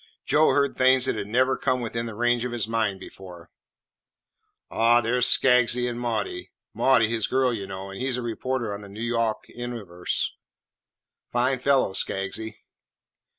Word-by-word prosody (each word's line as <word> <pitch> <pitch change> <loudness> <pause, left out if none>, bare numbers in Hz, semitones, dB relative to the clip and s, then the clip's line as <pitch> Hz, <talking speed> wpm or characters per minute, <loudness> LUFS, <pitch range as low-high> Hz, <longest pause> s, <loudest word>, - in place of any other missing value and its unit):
Joe 155 +1 +4
heard 140 -1 +1
things 130 0 +4
that - - 0
had 100 -2 -4
never 130 +4 +2
come 130 0 0
within 115 0 -3
the 115 - -7
range 120 +1 +1
of 125 - -3
his 120 -3 -2
mind 110 -4 -1
before. 90 -3 -12 1.2
"Aw, 115 +1 +4
there 120 +2 0
's 125 - +5
Skaggsy 125 -1 +4
an' 120 -1 -4
Maudie 110 -6 -3 0.2
Maudie 125 -4 +3
's - - -4
his 115 -2 -1
girl, 130 -1 +1
y' 100 -4 -4
know, 95 0 -7
an' 95 - -8
he 130 +2 -2
's 125 - -1
a 125 - -4
reporter 120 -1 -3
on 100 - -7
the 100 - -11
N' 100 - -13
Yawk 115 -1 -1
Universe. 110 -8 -4 1.0
Fine 125 +2 +1
fellow, 135 -6 +2
Skaggsy." 100 +4 -2
115 Hz, 175 wpm, -25 LUFS, 105-125 Hz, 1.2 s, s